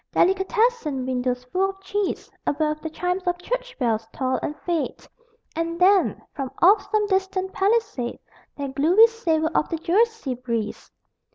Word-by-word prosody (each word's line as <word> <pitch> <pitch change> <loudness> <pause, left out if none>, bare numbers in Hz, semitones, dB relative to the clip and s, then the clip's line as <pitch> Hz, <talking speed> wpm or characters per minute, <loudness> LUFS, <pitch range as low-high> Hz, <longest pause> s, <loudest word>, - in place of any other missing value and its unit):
Delicatessen 385 - +2
windows 250 -1 -1
full 370 +10 0
of 385 0 -8
cheese 400 +1 -3 0.2
Above, 305 +1 0
the 320 - -4
chimes 360 +4 -2
of 355 0 +1
church - - -4
bells 225 -3 0
toll 260 -1 -1
and 295 - -4
fade 340 -3 -2 0.5
And 335 +1 -2
then, 380 +1 +4
from 270 -3 -4
off 395 +3 +5
some 430 -1 +2
distant 380 -1 -1
Palisade 405 - 0 0.4
That 280 -2 -4
gluey 345 +11 +6
savor 330 -9 0
on - - +2
the 330 - -2
Jersey 410 - +1
breeze! 235 -3 -4
345 Hz, 150 wpm, -24 LUFS, 275-395 Hz, 0.5 s, gluey